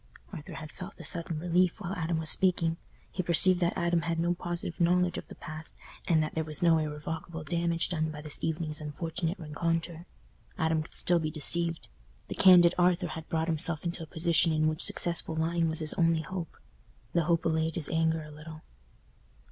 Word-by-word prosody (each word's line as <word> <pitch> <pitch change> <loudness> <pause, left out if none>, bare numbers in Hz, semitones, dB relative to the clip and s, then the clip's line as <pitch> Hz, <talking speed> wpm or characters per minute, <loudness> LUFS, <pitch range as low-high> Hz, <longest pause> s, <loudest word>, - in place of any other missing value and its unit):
Arthur 155 -5 -8
had 155 -1 -8
felt 185 +2 -10
a - - -8
sudden 170 -2 -2
relief 175 +3 +1
while 190 -2 -4
Adam 170 -3 -1
was 160 -1 +2
speaking; 165 -3 +2 0.3
he 185 - -2
perceived 175 +1 +6
that 175 -1 0
Adam 170 0 +1
had 165 0 -2
no 175 +1 +1
positive 175 -1 -4
knowledge 180 +1 +3
of - - -12
the - - -11
past, 155 0 -9 0.3
and 160 -2 +3
that 155 - -4
there 160 - -1
was 155 +1 -6
no 165 -2 +5
irrevocable 155 +2 -5
damage 170 0 0
done 160 -3 -1
by 150 -1 -7
this 150 -1 -2
evening's 160 -1 -2
unfortunate 165 +4 -3
rencontre. 165 +1 -3 0.5
Adam 160 0 +1
could 155 - -10
still 175 -1 +3
be 155 -1 -2
deceived. 165 +2 +1 0.4
The - - -3
candid 180 -2 +7
Arthur 175 0 +2
had 160 -1 -8
brought 160 0 0
himself 160 0 -1
into 170 0 -3
a 160 - -7
position 165 +1 +2
in 155 0 +2
which 155 +2 -1
successful 170 -2 0
lying 165 +1 0
was 160 +1 -3
his 155 - -2
only 165 -2 +2
hope. 175 -1 -6 0.6
The 170 -2 +2
hope 170 +1 +1
allayed 160 0 0
his 160 -4 +1
anger 160 -1 +1
a 150 - -11
little. 155 +1 -11
165 Hz, 195 wpm, -29 LUFS, 155-175 Hz, 0.6 s, candid